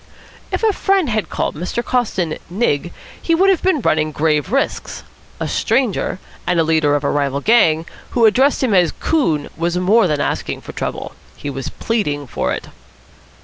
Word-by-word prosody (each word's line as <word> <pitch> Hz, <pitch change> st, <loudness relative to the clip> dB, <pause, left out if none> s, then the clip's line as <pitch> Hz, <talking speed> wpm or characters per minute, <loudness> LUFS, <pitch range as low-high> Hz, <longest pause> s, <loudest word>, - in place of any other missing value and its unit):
If -, -, -2 dB
a 435 Hz, -2 st, +4 dB
friend 385 Hz, -6 st, +1 dB
had 215 Hz, -2 st, -1 dB
called -, -, -2 dB
Mr. 180 Hz, +9 st, -4 dB
Coston 190 Hz, -10 st, -1 dB
"Nig" 175 Hz, -5 st, 0 dB, 0.3 s
he 330 Hz, -, +2 dB
would 385 Hz, +3 st, +4 dB
have 370 Hz, -, +1 dB
been 370 Hz, -7 st, +1 dB
running 155 Hz, -5 st, +1 dB
grave 155 Hz, +4 st, 0 dB
risks. 275 Hz, +2 st, -2 dB, 0.4 s
A -, -, -2 dB
stranger, 235 Hz, -8 st, 0 dB, 0.3 s
and 175 Hz, -1 st, +2 dB
a -, -, +4 dB
leader 155 Hz, -2 st, +2 dB
of 145 Hz, -, -1 dB
a -, -, +1 dB
rival 140 Hz, -1 st, 0 dB
gang, 165 Hz, -5 st, +3 dB, 0.3 s
who 235 Hz, -, +5 dB
addressed 265 Hz, +7 st, +3 dB
him 240 Hz, -5 st, +2 dB
as 180 Hz, -3 st, +3 dB
"coon" 165 Hz, -, 0 dB
was 170 Hz, +2 st, -1 dB
more 195 Hz, +4 st, +4 dB
than 150 Hz, -3 st, 0 dB
asking -, -, -2 dB
for -, -, -9 dB
trouble. -, -, -4 dB, 0.2 s
He 145 Hz, -, -5 dB
was 135 Hz, -1 st, -5 dB
pleading 150 Hz, -11 st, -2 dB
for 120 Hz, -, -2 dB
it. -, -, -4 dB
180 Hz, 180 wpm, -18 LUFS, 155-245 Hz, 0.4 s, who